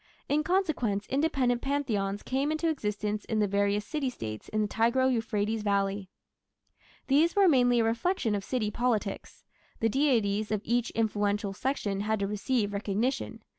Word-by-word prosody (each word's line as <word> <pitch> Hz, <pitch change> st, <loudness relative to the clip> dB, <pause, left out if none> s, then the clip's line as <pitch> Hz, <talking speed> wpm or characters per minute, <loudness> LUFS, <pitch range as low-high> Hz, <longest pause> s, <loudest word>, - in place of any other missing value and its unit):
In 295 Hz, +2 st, +2 dB
consequence 300 Hz, -, 0 dB
independent 265 Hz, -4 st, +1 dB
Pantheons 215 Hz, -8 st, -1 dB
came 275 Hz, +3 st, 0 dB
into 315 Hz, +2 st, 0 dB
existence 210 Hz, -6 st, -2 dB
in 220 Hz, -, -2 dB
the 210 Hz, -, +3 dB
various 200 Hz, +1 st, +1 dB
city 295 Hz, -1 st, -2 dB
States 110 Hz, -, -7 dB
in 215 Hz, 0 st, 0 dB
the -, -, 0 dB
Tigro 235 Hz, +5 st, +2 dB
Euphrates 220 Hz, -1 st, -1 dB
valley. 200 Hz, -1 st, 0 dB, 1.0 s
These 305 Hz, +5 st, +3 dB
were 400 Hz, -2 st, +5 dB
mainly 245 Hz, -6 st, +4 dB
a -, -, +2 dB
reflection 230 Hz, -, 0 dB
of 200 Hz, -1 st, -2 dB
city 215 Hz, -2 st, -1 dB
politics: 220 Hz, -4 st, -2 dB, 0.4 s
the 225 Hz, -, +2 dB
deities 220 Hz, -6 st, +1 dB
of 210 Hz, -2 st, 0 dB
each 240 Hz, +1 st, 0 dB
influential 205 Hz, -2 st, 0 dB
section 205 Hz, -4 st, -2 dB
had 215 Hz, +1 st, 0 dB
to 200 Hz, -, 0 dB
receive 210 Hz, +1 st, -1 dB
recognition. 225 Hz, +3 st, -2 dB
225 Hz, 155 wpm, -29 LUFS, 205-265 Hz, 1.0 s, were